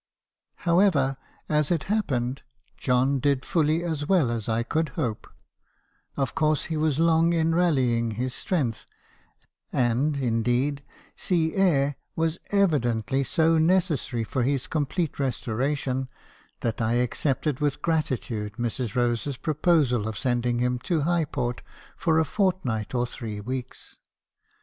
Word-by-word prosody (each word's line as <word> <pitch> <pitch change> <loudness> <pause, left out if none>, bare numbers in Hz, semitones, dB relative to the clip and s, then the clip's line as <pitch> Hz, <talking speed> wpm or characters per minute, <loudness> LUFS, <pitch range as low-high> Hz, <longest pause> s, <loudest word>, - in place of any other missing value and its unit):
" - - -59
However, 170 -7 +3 0.3
as 150 -1 +1
it 165 -4 +1
happened, 135 - -1 0.3
John 130 +2 +1
did 140 -1 +1
fully 160 -1 +1
as 155 -4 -2
well 170 -11 +3
as 115 -2 -3
I 115 +1 +1
could 155 +5 -1
hope 110 -4 -2 0.5
— - - -41
of 135 -2 -1
course 155 -2 +1
he - - -1
was 155 -2 +1
long 165 +1 +4
in 165 -1 +2
rallying 130 -10 +2
his 125 +3 -2
strength; 130 - -2 0.8
and, 130 +4 +1
in 115 -4 0
deed, 135 +4 0 0.3
sea 165 -3 0
air 145 -8 +2 0.2
was 165 +1 0
evidently 135 - +1
so 160 +4 +2
necessary 160 -8 +1
for 130 +3 -2
his 135 +1 0
complete 155 +1 -2
re 135 -2 +2
storation, 130 +2 -2 0.5
that 115 0 -2
I 110 +1 +1
accepted 130 +3 0
with 145 -2 -1
gratitude 115 - -1
Mrs. 120 0 -3
Eos 120 +1 +1
e's 140 -3 -3
proposal 150 -8 +2
of 110 -2 -4
sending 120 -1 0
him 125 0 0
to 165 +2 0
Highport 145 -7 -1 0.4
for 165 -4 +1
a 160 - +2
fortnight 160 - -1
or 120 0 +2
three 115 -4 -6
weeks. 125 +4 -6
135 Hz, 140 wpm, -26 LUFS, 120-160 Hz, 0.8 s, long